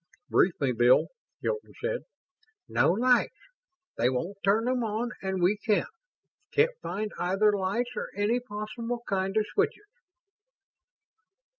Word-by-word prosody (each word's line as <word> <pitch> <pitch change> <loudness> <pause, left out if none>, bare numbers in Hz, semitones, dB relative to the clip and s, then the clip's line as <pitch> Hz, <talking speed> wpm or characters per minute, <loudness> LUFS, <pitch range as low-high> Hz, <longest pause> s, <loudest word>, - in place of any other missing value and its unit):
"Brief 180 - +3
me, 135 -3 +1
Bill," 120 +1 +4 0.3
Hilton 450 -2 -3
said. - - -2 0.6
"No - - +3
lights. 250 +4 +3 0.6
They 120 - +4
won't 170 +10 -3
turn 215 +4 +3
'em 250 -1 +1
on 225 +3 -2
and 190 -2 -2
we 195 +4 +3
can't. 210 -2 +1 0.6
Can't 485 +3 +3
find 210 +1 -3
either 205 +3 +3
lights 205 +6 -1
or - - -4
any 210 +5 +1
possible 235 +1 -5
kind 195 +1 0
of 215 - +3
switches." 420 0 0
215 Hz, 130 wpm, -28 LUFS, 190-245 Hz, 0.6 s, Bill